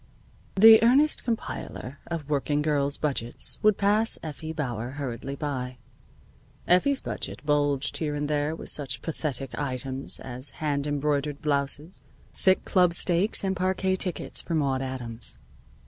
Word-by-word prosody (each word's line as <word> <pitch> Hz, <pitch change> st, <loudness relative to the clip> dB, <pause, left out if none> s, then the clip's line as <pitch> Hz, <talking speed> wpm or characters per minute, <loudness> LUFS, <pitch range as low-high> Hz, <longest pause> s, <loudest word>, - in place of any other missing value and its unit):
The 220 Hz, +3 st, +9 dB
earnest 270 Hz, +6 st, +4 dB
compiler 145 Hz, -, -5 dB
of 165 Hz, -4 st, -5 dB
working 145 Hz, 0 st, 0 dB
girls' 145 Hz, -2 st, 0 dB
budgets 130 Hz, -6 st, -1 dB
would 215 Hz, -2 st, +4 dB
pass 210 Hz, +3 st, +3 dB
Effie 155 Hz, 0 st, -6 dB
Bauer 125 Hz, -6 st, -4 dB
hurriedly 135 Hz, -1 st, -5 dB
by. 130 Hz, -3 st, -4 dB, 0.9 s
Effie's 265 Hz, +11 st, +4 dB
budget -, -, -5 dB
bulged 145 Hz, -2 st, +1 dB
here 150 Hz, -2 st, -2 dB
and 145 Hz, 0 st, -2 dB
there 150 Hz, +1 st, 0 dB
with -, -, -3 dB
such 145 Hz, -3 st, -1 dB
pathetic 140 Hz, -5 st, -4 dB
items 135 Hz, -1 st, -2 dB
as 130 Hz, +2 st, -3 dB
hand 145 Hz, -2 st, -1 dB
embroidered 145 Hz, 0 st, -1 dB
blouses, 145 Hz, +3 st, -1 dB, 0.3 s
thick 190 Hz, -1 st, +2 dB
club 180 Hz, -3 st, +3 dB
steaks, 180 Hz, +5 st, +2 dB
and 190 Hz, -1 st, 0 dB
parquet 185 Hz, +1 st, 0 dB
tickets 180 Hz, -2 st, -1 dB
for 170 Hz, -, -3 dB
Maude 135 Hz, -4 st, 0 dB
Adams. 120 Hz, -, -5 dB
145 Hz, 135 wpm, -26 LUFS, 135-175 Hz, 0.9 s, The